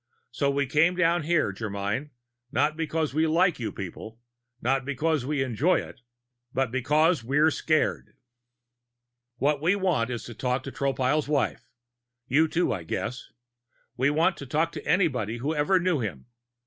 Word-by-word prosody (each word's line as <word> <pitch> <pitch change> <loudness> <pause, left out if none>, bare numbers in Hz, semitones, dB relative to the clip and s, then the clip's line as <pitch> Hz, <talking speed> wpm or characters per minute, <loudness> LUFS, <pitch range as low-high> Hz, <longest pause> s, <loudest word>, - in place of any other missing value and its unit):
So 140 +3 0
we 140 0 +1
came 155 +7 +3
down 175 -1 +2
here, 155 - +1
Germyn, 105 +6 -3 0.4
not 150 +2 +1
because 160 -2 -2
we 160 +2 +2
like 170 +1 +2
you 110 -4 -3
people, 105 +5 -8 0.4
not 135 +2 +1
because 140 0 -1
we 145 -2 0
enjoy 135 +8 +2
it, - - -10 0.5
but 130 -2 0
because 150 +4 +2
we're 150 +6 +3
scared. 155 0 0 1.2
"What 145 +2 +1
we 175 +5 +3
want 175 -12 +1
is 120 -2 -4
to 120 - -8
talk 125 +2 -1
to 140 - -6
Tropile's 140 +2 0
wife 145 -2 -1 0.6
you, 150 +5 +3
too, 165 -5 0
I 95 - -4
guess; 115 +9 -4 0.7
we 130 +3 +2
want 165 +5 +2
to 140 - -8
talk 160 +6 0
to - - -8
anybody 130 - +1
who 140 +6 -2
ever 160 +5 +2
knew 175 -4 +1
him. 95 - -4
140 Hz, 160 wpm, -26 LUFS, 125-160 Hz, 1.2 s, came